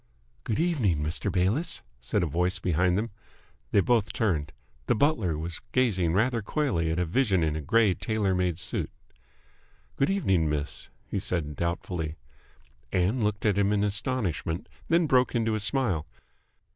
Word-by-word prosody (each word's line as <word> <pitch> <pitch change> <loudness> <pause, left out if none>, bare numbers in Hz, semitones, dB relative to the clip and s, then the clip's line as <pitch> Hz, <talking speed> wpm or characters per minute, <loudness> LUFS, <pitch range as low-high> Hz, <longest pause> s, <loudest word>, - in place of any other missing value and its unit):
"Good 110 - -1
evening, 120 - +1
Mr. 75 +2 -2
Bayliss," 105 - 0 0.2
said - - 0
a - - +2
voice 90 +4 0
behind 90 +1 +1
them. 110 +2 -2 0.6
They 100 - +5
both 115 0 +1
turned. 80 -9 0 0.4
The - - +3
butler 110 - +2
was 85 +2 -5
gazing 95 -10 +2
rather 115 +4 +2
coyly 100 - 0
at 80 - -1
a 90 - +1
vision 95 -1 +2
in 75 -1 0
a 80 - -3
grey 105 +6 +3
tailor 105 -1 0
made 90 -3 0
suit. 90 - -2 1.1
"Good 135 - +2
evening, 95 - +2
miss," 75 0 -3 0.2
he - - -3
said 80 -6 -2
doubtfully. 85 -1 -2 0.8
Ann 100 +7 +1
looked 105 0 -1
at 100 -2 +3
him 100 0 +3
in 105 -1 +2
astonishment, 105 - -2 0.2
then 170 0 +3
broke 130 -3 +3
into 115 -1 +1
a 110 - 0
smile. 100 - 0
95 Hz, 160 wpm, -27 LUFS, 85-115 Hz, 1.1 s, They